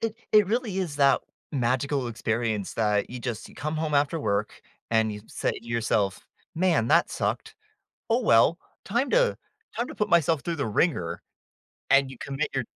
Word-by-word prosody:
It 225 Hz, -1 st, -2 dB, 0.2 s
it 210 Hz, -2 st, +6 dB
really 220 Hz, -3 st, -1 dB
is 170 Hz, -7 st, -2 dB
that 140 Hz, -2 st, +4 dB, 0.3 s
magical 130 Hz, +1 st, 0 dB
experience 110 Hz, -2 st, -2 dB
that, 105 Hz, -2 st, +1 dB
you 125 Hz, -, -6 dB
just 120 Hz, -3 st, -5 dB
you -, -, -16 dB
come 155 Hz, +1 st, -3 dB
home 155 Hz, -1 st, -1 dB
after 145 Hz, +3 st, +2 dB
work, 100 Hz, -8 st, -2 dB, 0.3 s
and 110 Hz, -1 st, +2 dB
you 105 Hz, -, -7 dB
say -, -, -2 dB
to 115 Hz, -, -10 dB
yourself, 110 Hz, -4 st, 0 dB, 0.3 s
"Man, 165 Hz, -9 st, +2 dB
that 170 Hz, -, +4 dB
sucked. -, -, -2 dB, 0.5 s
Oh, 235 Hz, +3 st, +2 dB
well! 165 Hz, -, +4 dB, 0.3 s
Time 240 Hz, +7 st, 0 dB
to -, -, +3 dB, 0.4 s
time 240 Hz, +2 st, -1 dB
to -, -, -8 dB
put 210 Hz, -, -1 dB
myself 165 Hz, -3 st, +3 dB
through 170 Hz, -1 st, -3 dB
the 140 Hz, -, -1 dB
wringer," 95 Hz, -, 0 dB, 0.7 s
and 135 Hz, -1 st, +5 dB
you 130 Hz, -, -10 dB
commit 140 Hz, +2 st, -3 dB
your 130 Hz, -3 st, 0 dB
140 Hz, 180 wpm, -26 LUFS, 115-170 Hz, 0.7 s, it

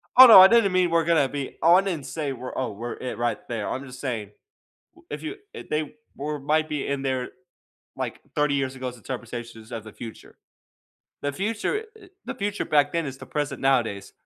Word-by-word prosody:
Oh 260 Hz, +1 st, +12 dB
no, 225 Hz, -, +11 dB
I 190 Hz, -, +11 dB
didn't 230 Hz, -4 st, +4 dB
mean 185 Hz, -1 st, +3 dB
we're 165 Hz, 0 st, +3 dB
gonna 160 Hz, -4 st, +3 dB
be 140 Hz, 0 st, -5 dB
on 180 Hz, +4 st, +5 dB
and 160 Hz, -7 st, -3 dB
say, 145 Hz, +1 st, -3 dB
"We're 125 Hz, 0 st, -7 dB
Oh, 130 Hz, -4 st, -1 dB
we're 115 Hz, +4 st, -5 dB
it 125 Hz, -, -6 dB
right 120 Hz, 0 st, 0 dB
there." 115 Hz, -3 st, -3 dB
I'm 135 Hz, +2 st, -4 dB
just 130 Hz, 0 st, -11 dB
saying, 115 Hz, -7 st, -4 dB, 0.6 s
w 345 Hz, 0 st, -22 dB
if -, -, -5 dB
you 350 Hz, +6 st, -5 dB, 0.2 s
if -, -, -9 dB
they 150 Hz, -1 st, -2 dB, 0.2 s
we're 150 Hz, +1 st, -3 dB
might 155 Hz, +3 st, +1 dB
be 150 Hz, -2 st, -3 dB
in 140 Hz, -1 st, -2 dB
there, 130 Hz, -2 st, -2 dB, 0.7 s
like, -, -, -5 dB
30 150 Hz, -1 st, +2 dB
years 135 Hz, -1 st, -1 dB
ago 130 Hz, -1 st, -5 dB
since 125 Hz, -, -14 dB
interpretation 120 Hz, -1 st, -7 dB
of 110 Hz, -2 st, -5 dB
the 110 Hz, -, -11 dB
future. 115 Hz, -2 st, -10 dB, 0.9 s
The 145 Hz, -, -1 dB
future 220 Hz, -, -2 dB
it 390 Hz, -4 st, -17 dB
The -, -, -5 dB
future 205 Hz, +1 st, -2 dB
back 145 Hz, -1 st, +3 dB
then 165 Hz, -2 st, -1 dB
is 135 Hz, -1 st, -6 dB
the -, -, -10 dB
present 145 Hz, -3 st, -3 dB
nowadays. 120 Hz, -7 st, +1 dB
140 Hz, 210 wpm, -25 LUFS, 125-170 Hz, 0.9 s, Oh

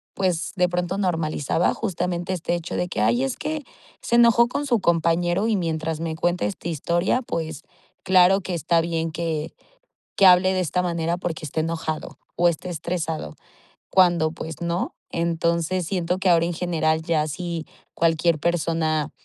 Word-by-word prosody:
pues, 180 Hz, -3 st, -1 dB
de 180 Hz, -1 st, +3 dB
pronto 180 Hz, +2 st, -2 dB
normalizaba, 165 Hz, -4 st, 0 dB
justamente 180 Hz, -3 st, -2 dB
este 175 Hz, 0 st, -1 dB
hecho 170 Hz, 0 st, -5 dB
de 180 Hz, -, -1 dB
que: 105 Hz, -, -3 dB
"Ay, 120 Hz, +4 st, +2 dB
es 135 Hz, -, -2 dB
que 300 Hz, 0 st, -3 dB, 0.4 s
se 235 Hz, -, 0 dB
enojó 235 Hz, 0 st, +6 dB
con 285 Hz, +4 st, -3 dB
su 240 Hz, -5 st, +2 dB
compañero 175 Hz, +3 st, +1 dB
y 220 Hz, -, +2 dB
mientras 160 Hz, -3 st, -2 dB
me 165 Hz, -1 st, -3 dB
cuenta 175 Hz, -4 st, 0 dB
esta 105 Hz, -, -4 dB
historia, 170 Hz, -, 0 dB
pues, 160 Hz, -, -4 dB, 0.4 s
claro 185 Hz, +1 st, +5 dB
que 185 Hz, -, -5 dB
está 165 Hz, +1 st, +2 dB
bien 165 Hz, -1 st, -2 dB
que 160 Hz, -2 st, -3 dB, 0.7 s
que 195 Hz, -, +7 dB
hable 185 Hz, +1 st, +6 dB
de 185 Hz, -, +1 dB
esta 180 Hz, +2 st, 0 dB
manera 170 Hz, -1 st, -1 dB
porque 165 Hz, -3 st, -4 dB
está 155 Hz, +2 st, -3 dB
enojado 160 Hz, -1 st, -3 dB, 0.2 s
o 175 Hz, -, +3 dB
está 170 Hz, +2 st, -4 dB
estresado", 165 Hz, -, -3 dB, 0.6 s
cuando, 175 Hz, -4 st, +4 dB
pues, 160 Hz, -1 st, -7 dB
¿no? 170 Hz, +1 st, -2 dB, 0.2 s
Entonces, 170 Hz, +1 st, 0 dB
siento 180 Hz, 0 st, -1 dB
que 190 Hz, -, 0 dB
ahora, 170 Hz, 0 st, +4 dB
en 175 Hz, -, -2 dB
general, 160 Hz, -2 st, 0 dB
ya 155 Hz, -2 st, +1 dB
si 170 Hz, +1 st, -4 dB, 0.3 s
cualquier 165 Hz, 0 st, +2 dB
persona 160 Hz, -2 st, 0 dB
170 Hz, 165 wpm, -23 LUFS, 160-180 Hz, 0.7 s, que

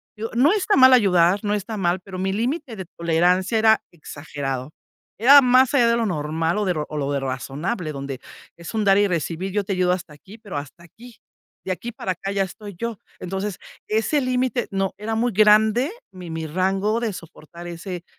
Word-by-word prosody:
Digo, 225 Hz, +2 st, -5 dB
no 285 Hz, +10 st, +4 dB
está 415 Hz, 0 st, +1 dB
mal 260 Hz, 0 st, +8 dB
ayudar, 190 Hz, -4 st, +4 dB
no 205 Hz, 0 st, 0 dB
está 210 Hz, +2 st, -3 dB
mal, 180 Hz, -2 st, 0 dB
pero 185 Hz, 0 st, -9 dB
mi 190 Hz, +1 st, -1 dB
límite 240 Hz, -, -3 dB
de 190 Hz, -, -6 dB
tolerancia 180 Hz, +5 st, +2 dB
era 220 Hz, 0 st, +4 dB
exagerado. 145 Hz, -4 st, -6 dB, 0.5 s
Era 280 Hz, +4 st, +9 dB
más 255 Hz, +1 st, +4 dB
allá 240 Hz, -4 st, +4 dB
de 235 Hz, -, +2 dB
lo 230 Hz, -, 0 dB
normal 160 Hz, +1 st, -1 dB
o 210 Hz, -, 0 dB
de 185 Hz, -, +1 dB
ro 150 Hz, -2 st, -3 dB
o 155 Hz, -, -7 dB
lo 140 Hz, -1 st, -2 dB
de 140 Hz, -, 0 dB
razonable, 140 Hz, -, -4 dB
donde 140 Hz, -2 st, -6 dB, 0.3 s
es 170 Hz, +5 st, -9 dB
un 215 Hz, -2 st, 0 dB
dar 195 Hz, 0 st, +5 dB
y 205 Hz, -, +4 dB
recibir, 175 Hz, +2 st, -3 dB
yo 205 Hz, -1 st, -1 dB
te 195 Hz, -, -2 dB
ayudo 180 Hz, -1 st, +1 dB
hasta 180 Hz, -4 st, -4 dB
aquí, 190 Hz, +9 st, -14 dB
pero 205 Hz, -8 st, -10 dB
hasta 145 Hz, +4 st, -8 dB
aquí. 230 Hz, +7 st, -15 dB, 0.5 s
De 185 Hz, -, -1 dB
aquí 235 Hz, +6 st, -7 dB
para 190 Hz, -4 st, -3 dB
acá 195 Hz, +3 st, -5 dB
ya 200 Hz, -1 st, +1 dB
estoy 200 Hz, +2 st, -9 dB
yo. 230 Hz, -4 st, -4 dB, 0.2 s
Entonces, 190 Hz, +2 st, -4 dB, 0.3 s
ese 225 Hz, +7 st, +1 dB
límite, 255 Hz, -1 st, -1 dB
no, 195 Hz, -1 st, -1 dB
era 220 Hz, +1 st, -3 dB
muy 235 Hz, -1 st, 0 dB
grande, 215 Hz, -, +4 dB, 0.2 s
mi 180 Hz, -2 st, -9 dB
mi 160 Hz, 0 st, -4 dB
rango 195 Hz, +7 st, 0 dB
de 230 Hz, -, -1 dB
soportar 170 Hz, -1 st, -11 dB
ese, 175 Hz, +1 st, -7 dB
195 Hz, 205 wpm, -22 LUFS, 170-225 Hz, 0.5 s, Era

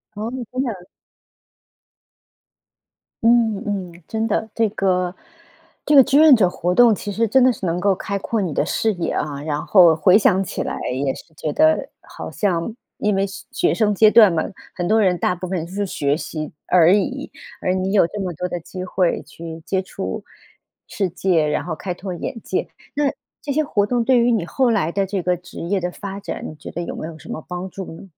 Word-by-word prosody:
哦， 215 Hz, +3 st, -4 dB, 0.2 s
真 255 Hz, +1 st, -1 dB
的。 195 Hz, -9 st, -5 dB, 2.4 s
嗯， 230 Hz, -3 st, +3 dB
嗯， 180 Hz, -4 st, -5 dB
真 220 Hz, +4 st, -2 dB
的， 220 Hz, 0 st, -1 dB
这 225 Hz, -1 st, +2 dB
个， 185 Hz, -3 st, 0 dB, 0.7 s
这 295 Hz, -, +3 dB
个 270 Hz, -, +10 dB
志 270 Hz, -, +2 dB
愿 310 Hz, -3 st, +8 dB
者 190 Hz, -6 st, +3 dB
活 180 Hz, 0 st, -1 dB
动 240 Hz, 0 st, +7 dB
其 205 Hz, -, -5 dB
实 220 Hz, +3 st, +1 dB
真 260 Hz, +5 st, +3 dB
的 255 Hz, 0 st, +5 dB
是 200 Hz, -, -6 dB
能 170 Hz, 0 st, 0 dB
够 195 Hz, +1 st, +2 dB
开 200 Hz, +2 st, -3 dB
阔 220 Hz, +2 st, -1 dB
你 175 Hz, -6 st, -2 dB
的 -, -, +1 dB
视 220 Hz, -, 0 dB
野 175 Hz, -, -2 dB
啊， 145 Hz, -2 st, -3 dB
然 150 Hz, -1 st, -3 dB
后 175 Hz, -5 st, +6 dB
回 180 Hz, +4 st, +5 dB
想 195 Hz, -2 st, +3 dB
起 185 Hz, -, -4 dB
来 -, -, -4 dB, 0.2 s
也 135 Hz, +1 st, -1 dB
是 160 Hz, -, -14 dB
觉 150 Hz, -1 st, -4 dB
得， 315 Hz, 0 st, +3 dB
好 -, -, -9 dB
像 200 Hz, +2 st, -1 dB, 0.2 s
因 210 Hz, -1 st, +1 dB
为 195 Hz, 0 st, +1 dB
学 195 Hz, +1 st, -9 dB
学 -, -, +2 dB
生 210 Hz, -2 st, +1 dB
阶 215 Hz, +2 st, +6 dB
段 215 Hz, -5 st, +7 dB
嘛， 160 Hz, -, +1 dB, 0.3 s
很 175 Hz, -, -2 dB
多 220 Hz, +1 st, +4 dB
人 185 Hz, -3 st, +3 dB
大 180 Hz, -, +1 dB
部 185 Hz, +1 st, -6 dB
分 180 Hz, -3 st, -2 dB
是 200 Hz, +4 st, -3 dB
学 145 Hz, -6 st, 0 dB
习 155 Hz, -2 st, -5 dB, 0.2 s
而 175 Hz, 0 st, +5 dB
已， 265 Hz, +8 st, -1 dB, 0.3 s
而 185 Hz, -, +1 dB
你 190 Hz, +1 st, -1 dB
有 200 Hz, -, +5 dB
这 205 Hz, -, -7 dB
么 185 Hz, -3 st, -3 dB
多 175 Hz, +3 st, -4 dB
的 175 Hz, -, -3 dB
机 185 Hz, +2 st, -8 dB
会 180 Hz, -1 st, 0 dB
去 160 Hz, +2 st, -9 dB
接 190 Hz, -1 st, 0 dB
触 190 Hz, -, -6 dB, 0.6 s
世 195 Hz, -3 st, -1 dB
界， 170 Hz, -3 st, +1 dB
然 150 Hz, -, -1 dB
后 170 Hz, -, -4 dB
开 180 Hz, +1 st, -4 dB
拓 185 Hz, +1 st, -6 dB
眼 220 Hz, +6 st, -5 dB
界。 -, -, -2 dB, 0.3 s
那， 295 Hz, 0 st, 0 dB, 0.4 s
这 285 Hz, -, -3 dB
些 310 Hz, +2 st, +2 dB
活 205 Hz, -8 st, +1 dB
动 240 Hz, +2 st, 0 dB
对 255 Hz, +1 st, +4 dB
于 240 Hz, +1 st, +3 dB
你 205 Hz, -7 st, 0 dB
后 255 Hz, +7 st, +1 dB
来 200 Hz, -8 st, +1 dB
的 195 Hz, +2 st, 0 dB
这 195 Hz, 0 st, -2 dB
个 180 Hz, 0 st, 0 dB
职 180 Hz, -, -11 dB
业 190 Hz, +4 st, 0 dB
的 180 Hz, 0 st, -2 dB
发 200 Hz, -1 st, -6 dB
展， 205 Hz, -, -6 dB
你 155 Hz, -, -7 dB
觉 150 Hz, -, -10 dB
得 175 Hz, -, -4 dB
有 -, -, -5 dB
没 155 Hz, -, -6 dB
有 165 Hz, -1 st, -9 dB
什 -, -, -14 dB
么 -, -, -5 dB
帮 180 Hz, +1 st, -5 dB
助 190 Hz, 0 st, -7 dB
呢？ 165 Hz, -, -11 dB
190 Hz, 235 characters per minute, -21 LUFS, 175-220 Hz, 2.4 s, 个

